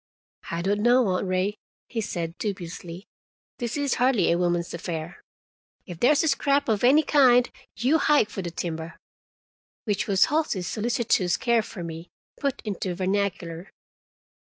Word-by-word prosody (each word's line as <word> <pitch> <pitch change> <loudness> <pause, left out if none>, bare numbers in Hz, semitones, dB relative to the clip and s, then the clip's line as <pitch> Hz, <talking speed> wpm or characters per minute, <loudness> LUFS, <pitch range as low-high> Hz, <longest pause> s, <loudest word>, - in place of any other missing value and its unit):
"I 170 0 -3
don't 200 +2 +1
know, 245 +2 +4
Aunt 185 +1 -1
Ray," 185 +3 -1 0.3
he 230 - -3
said 170 -5 -4
dubiously; 180 -2 -6 0.5
"this 240 +2 -3
is 285 -3 0
hardly 245 -10 +3
a 170 - +2
woman's 175 -1 0
affair. 170 -1 -6 0.6
If 175 -3 -9
there's 285 +5 +4
a - - +1
scrap 280 0 +2
of 220 -2 0
any 280 +6 +6
kind, 250 -5 +5 0.3
you 265 +8 +2
hike 290 -8 +3
for 195 - -4
the 175 - -4
timber." 165 -1 -5 0.9
Which 205 -2 -1
was 195 -2 +4
Halsey's 300 - -1
solicitous 215 -5 0
care 235 -2 +2
for 200 -4 -8
me, 165 +1 -7 0.3
put 280 -3 -2
into 190 -3 -3
vernacular. 185 -2 -2
200 Hz, 150 wpm, -25 LUFS, 175-245 Hz, 0.9 s, any